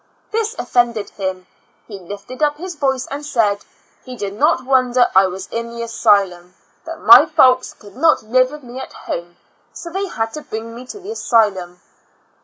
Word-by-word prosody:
This 450 +1 -1
ofiended 235 - 0
him; 190 -2 -4 0.4
he 195 - -9
lifted 205 - -9
up 295 -1 +1
his 360 +3 -6
voice 265 -4 -1
and 285 +1 -5
said, 220 -8 0 0.4
"He 255 -1 -9
did 200 -4 -5
not 280 +3 +1
wonder 255 -2 +3
I 190 0 +6
was 185 +1 -6
in 230 0 -4
the 235 0 -6
asylum 195 -6 +1
— - - -39
that - - -8
my - - +8
folks 255 0 +3
could 205 -1 -16
not 310 0 +3
live 255 +3 +2
with 300 0 -10
me 245 +1 -9
at - - -8
home, 175 +1 -7 0.4
so 340 - -9
they 390 +2 -2
had 225 -9 -3
to 305 - -6
bring 225 -3 -7
me 245 +2 -10
to 415 - -9
the 395 +3 -8
asylum." 195 - 0
240 Hz, 190 wpm, -18 LUFS, 200-275 Hz, 0.4 s, my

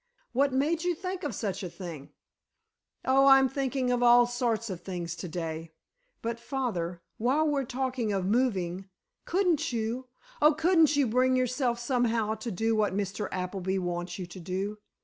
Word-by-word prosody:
What 275 +3 +3
made 305 +6 +1
you 355 -1 +1
think 370 +1 -4
of 280 -8 -3
such 200 -2 -3
a 180 - -4
thing?" 165 -6 -8 1.0
"Oh, 270 +1 +5
I'm 270 -1 +7
thinking 265 -1 -1
of 245 0 +1
all 240 0 +7
sorts 235 -2 -1
of 180 -2 -6
things 175 -2 -4
to 180 - -5
day. 165 -1 -5 0.5
But, 230 0 -2
father, 200 -10 -3 0.2
while 270 +7 +2
we're 280 -3 0
talking 255 -3 -2
of 195 -2 -1
moving—couldn't 235 - -1
you—oh, 255 - 0
couldn't 320 -2 +4
you, 285 -1 +3
bring 255 +3 +3
yourself, 250 -1 +1
somehow, 235 -3 +1
to 220 +2 -5
do 225 +4 0
what 210 -3 +1
Mr. 200 0 -2
Appleby 185 +1 -2
wants 175 -1 -3
you 185 - -4
to 175 +2 -10
do? 190 +4 -3
235 Hz, 160 wpm, -29 LUFS, 190-265 Hz, 1.0 s, I'm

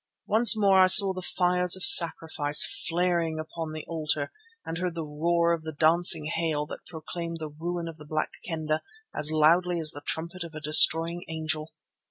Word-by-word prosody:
Once 225 +1 +1
more 195 -2 +1
I 185 - +4
saw 190 +1 +8
the 185 - -9
fires 180 0 0
of 190 - -7
sacrifice 160 - +6 0.2
flaring 170 -2 -3
upon 160 0 -9
the 155 0 -10
altar 155 -3 -4 0.3
and 165 +1 -8
heard 180 -2 -6
the 165 -2 -7
roar 170 +3 -2
of 165 - -6
the 160 -1 -9
dancing 165 0 +3
hail 160 -2 -4
that - - -13
proclaimed 170 0 -10
the 155 -1 -9
ruin 170 +3 -8
of 165 -1 -11
the 150 - -16
Black 155 0 -5
Kendah 155 -2 -5 0.3
as 150 +1 +1
loudly 170 +3 0
as 155 -2 0
the 145 - -12
trumpet 170 +4 -8
of 165 -2 -13
a - - -8
destroying 165 +3 +3
angel. 155 -1 -6
165 Hz, 185 wpm, -24 LUFS, 155-175 Hz, 0.3 s, saw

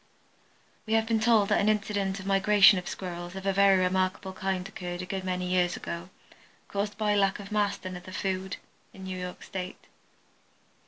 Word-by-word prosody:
We 220 - -1
have 225 0 +3
been 225 -1 +1
told 220 -3 +4
that - - +3
an 205 - +3
incident 205 -2 0
of 190 - -9
migration 195 0 +6
of 180 - -9
Squirrels 175 -1 -6
of 190 0 -7
a 195 - +2
very 195 0 +5
remarkable 185 +1 0
kind 190 -1 -2
occurred 180 -3 -6
a - - -5
good 190 0 -4
many 180 -1 -2
years 180 -1 +1
ago, 170 +2 -6 0.6
caused 205 +1 -2
by 210 -1 +1
lack 195 -1 +2
of 200 0 -9
mast 205 -2 0
and 185 -1 -4
other 180 +1 -9
food, 190 0 -3 0.4
in 190 - -11
New 190 0 -5
York 180 0 -6
State. 185 -2 -6
190 Hz, 190 wpm, -28 LUFS, 185-200 Hz, 0.6 s, migration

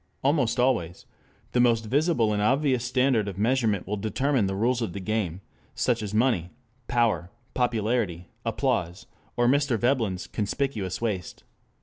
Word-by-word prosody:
Almost 135 -4 +2
always 115 -10 0 0.5
the 125 - +1
most 115 -2 +3
visible 130 -3 +2
and 105 - 0
obvious 130 +2 +2
standard 125 -3 +2
of 95 -2 -5
measurement 110 -3 +1
will 105 +2 -3
determine 115 +2 0
the 95 - -2
rules 120 +4 +1
of 110 -7 -2
the 100 - -5
game: 95 -3 -2 0.3
such 115 -2 +1
as 105 -2 -4
money, 110 -6 +1 0.4
power, 115 -7 +1 0.2
popularity, 110 -7 0 0.2
applause, 85 0 -1 0.3
or 120 0 +3
Mr. 140 -2 +2
Veblen's 115 -6 0
"conspicuous 105 -3 -2
waste." 105 -6 -3
115 Hz, 140 wpm, -26 LUFS, 100-125 Hz, 0.5 s, most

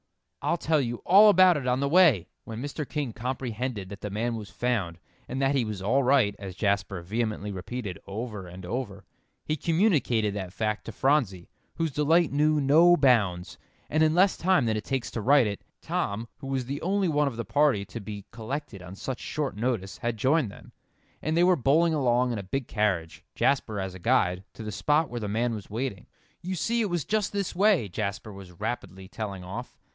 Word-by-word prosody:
I'll 170 - +1
tell 155 -2 +1
you 120 -2 -4
all 205 +4 +8
about 185 -3 +6
it 130 -3 -4
on 125 +1 +2
the 140 - +1
way." 150 - +5 0.2
When 115 +2 -6
Mr. 145 0 -5
King 145 -7 -3
comprehended 125 -3 -4
that 100 0 -9
the 105 - -4
man 115 +4 -2
was 105 -2 -7
found, 110 -9 -1 0.3
and 130 - -4
that 135 0 +2
he 135 -3 +2
was 105 -3 -4
"all 125 +8 +3
right," 125 -6 +3
as 95 -3 -7
Jasper 95 -2 -1
vehemently 110 +1 -2
repeated 100 +1 -5
over 105 -2 -5
and 90 +1 -10
over, 105 -2 -5 0.4
he 155 - 0
communicated 155 - +1
that 95 -3 -5
fact 105 +1 -2
to - - -6
Phronsie, 115 - 0 0.2
whose 165 -2 -1
delight 155 +4 +3
knew 150 +1 +2
no 160 +5 +6
bounds, 105 -11 +2 0.3
and 155 - +2
in 155 0 +4
less 190 +2 +4
time 180 -6 +3
than 110 -1 +1
it 110 - -3
takes 135 -3 -3
to 115 - -3
write 135 +2 +5
it, 100 -1 -4 0.2
Tom, 110 +4 -2
who 135 - -8
was 135 -2 -2
the 140 +3 -4
only 195 +2 +1
one 150 -2 +2
of 135 - -3
the 115 - -3
party 135 -4 +2
to 115 - -8
be 100 -1 -7
collected 115 -1 -6
on 90 +1 -9
such 125 +4 -5
short 150 -8 -3
notice, 105 -4 -2
had 120 -1 -2
joined 135 +2 +2
them, - - -14 0.5
and 155 +2 -1
they 175 - +5
were 180 0 +5
bowling 160 +4 +3
along 125 -3 +2
in 115 - -2
a - - -6
big 125 +7 -3
carriage, 95 -7 -1
Jasper 110 -7 +1
as 95 -1 -4
guide, 95 -4 +1
to 110 - -8
the 105 - -5
spot 150 +6 +1
where 120 - -3
the 105 - -4
man 115 +3 0
was 105 -3 -7
waiting. 115 -1 -4 0.3
"You 185 +2 -3
see 235 +7 0
it 210 - 0
was 175 -4 -1
just 215 -2 0
this 200 -2 -2
way," 195 - +3
Jasper 100 +3 -4
was 95 -2 -11
rapidly 105 -4 -5
telling 100 -3 -6
off. 110 +7 -7
120 Hz, 205 wpm, -27 LUFS, 105-150 Hz, 0.5 s, all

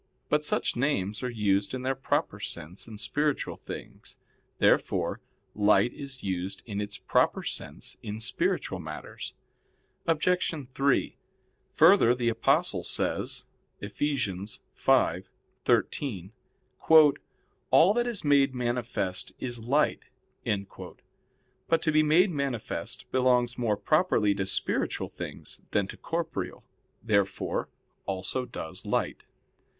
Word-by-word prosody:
But 150 0 +2
such - - 0
names 115 -6 0
are 125 - -2
used 100 -1 +1
in 130 - -5
their 130 +1 +1
proper 135 0 -1
sense 85 +9 -6
in 110 -2 -9
spiritual 140 +8 -1
things. - - -9 0.4
Therefore - - +2 0.3
light 105 +3 +4
is 135 -2 -7
used 95 0 -3
in 105 -2 -3
its 100 -1 -4
proper - - +1
sense - - -5
in 105 +1 -5
spiritual 110 - -1
matters. - - -7 0.7
Obj. 180 +3 +2 0.3
3: 140 +1 +1 0.6
Further, 160 -7 +6
the 120 -1 +1
Apostle 115 - +2
says - - -2 0.3
(Eph. 100 0 -7
5:13): 105 - -1 1.4
"All 185 +5 +6
that 240 +1 +1
is 235 -5 -3
made 140 -2 +4
manifest 120 -6 -2
is 120 -2 -4
light." 145 +4 +2 0.4
But 100 -1 -4 0.9
to 155 - +2
be 155 0 +5
made 165 +5 +4
manifest 140 -7 -4
belongs 125 -1 +3
more 110 -4 +1
properly 155 - +3
to 95 -1 -2
spiritual 95 - 0
things - - -8
than 100 - +1
to - - -7
corporeal. 165 - -4 0.4
Therefore 100 -3 0 0.4
also 95 +7 -2
does 80 - -7
light. - - -1
120 Hz, 115 wpm, -28 LUFS, 100-145 Hz, 1.4 s, Further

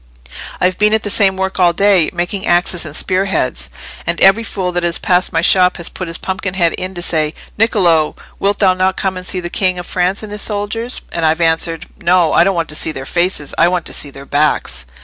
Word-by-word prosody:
"I've 180 0 0
been 210 +1 +4
at 220 - -1
the 205 - +1
same 195 -3 +3
work 190 0 -3
all 175 -2 +4
day—making 185 0 +1
axes 175 -1 +1
and 150 - -7
spear 185 +3 0
heads. 160 - -2 0.4
And 170 0 -1
every 195 +4 +5
fool 185 -5 -3
that 175 0 -1
has 170 -1 +1
passed 180 0 +1
my - - 0
shop 185 -1 +4
has 170 - 0
put 185 - -6
his 165 - -1
pumpkin 190 0 -4
head 170 -3 +2
in 185 +1 -5
to 175 - -2
say, 155 -2 +1 0.2
'Niccolò, 175 -9 +2 0.2
wilt 200 +1 0
thou 190 -3 +3
not 185 0 0
come 190 -1 -1
and 185 0 -6
see 185 - 0
the 175 0 -6
King 185 -2 +1
of 175 - -6
France 185 +4 -1
and 210 - -8
his 210 0 -4
soldiers?' 220 +4 -2
and 170 - -3
I've 160 +1 +2
answered, 165 0 0 0.2
'No: 175 -2 +3
I - - +5
don't 195 +1 +1
want 165 -2 -2
to 150 - -2
see 160 - 0
their 135 -3 -7
faces—I 170 -1 0
want 180 -1 -1
to - - -2
see 145 - -3
their 140 0 -12
backs. 145 - -1
180 Hz, 230 wpm, -15 LUFS, 165-190 Hz, 0.4 s, every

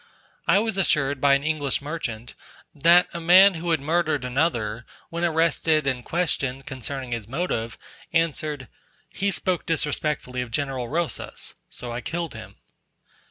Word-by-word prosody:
I 170 +3 +5
was 220 -1 0
assured 145 -7 +2
by 140 -1 +6
an 140 - -1
English 150 -3 0
merchant, 130 -7 -5 0.4
that 170 +4 +5
a 170 - -4
man 185 +4 +8
who 170 0 -4
had 160 -2 +3
murdered 155 -2 0
another, 120 -5 0 0.3
when 170 +1 -3
arrested 160 -2 +2
and 130 -3 0
questioned 135 -6 -2
concerning 130 0 -5
his 115 -3 -3
motive, 120 -5 -2 0.3
answered, 155 -4 -1 0.4
"He 200 +1 -1
spoke 185 -2 -1
disrespectfully 150 -5 -1
of 125 - -5
General 130 -1 -2
Rosas, 165 +2 -2 0.2
so 120 -1 -7
I 120 +1 -4
killed 170 +2 -4
him." 110 -1 -10
150 Hz, 145 wpm, -24 LUFS, 125-170 Hz, 0.4 s, man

